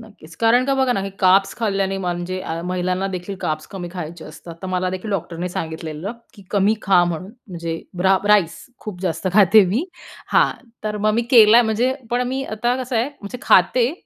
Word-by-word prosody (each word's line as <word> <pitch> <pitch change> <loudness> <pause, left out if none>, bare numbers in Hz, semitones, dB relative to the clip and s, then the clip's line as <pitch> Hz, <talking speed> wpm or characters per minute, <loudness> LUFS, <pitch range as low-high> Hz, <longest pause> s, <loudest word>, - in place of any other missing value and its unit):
नक्कीच, 200 -8 -15
कारण 235 +4 +3
का 275 - +2
बघा 260 -2 +2
ना, 195 - -1
हे 195 0 -4
कार्ब्स 195 +1 +4
खाल्ल्याने 195 -3 -1
म्हणजे 180 0 -3
अ, 165 -1 -4
महिलांना 185 +1 -1
देखील 190 +1 -5
कार्ब्स 155 0 -2
कमी 180 -3 -7
खायचे 170 -2 -7
असतात, 160 +2 -11
तर - - -4
मला 185 0 -1
देखील 185 +3 -5
डॉक्टरने 175 -1 -3
सांगितलेलं 160 +3 -5 0.2
की 200 - -15
कमी 205 +1 +2
खा 185 -2 +4
म्हणून, 175 +3 -4 0.2
म्हणजे 165 -2 -5 0.2
ब्रा 190 +1 +4
राईस 190 -6 +3 0.2
खूप 200 -5 -8
जास्त 180 -1 -3
खाते 205 +1 +6
मी. 230 - 0 0.5
हां, - - +4 0.3
तर 210 0 -2
मग 215 - +3
मी 235 - +1
केलाय 230 -1 +7
म्हणजे, 230 +4 +1 0.2
पण 245 +1 +1
मी 265 +1 -2
आता 240 +2 -1
कसं 250 -1 -3
आहे, 235 +4 +1
म्हणजे 205 +5 -7
खाते, 240 - +4
195 Hz, 190 wpm, -20 LUFS, 175-220 Hz, 0.5 s, केलाय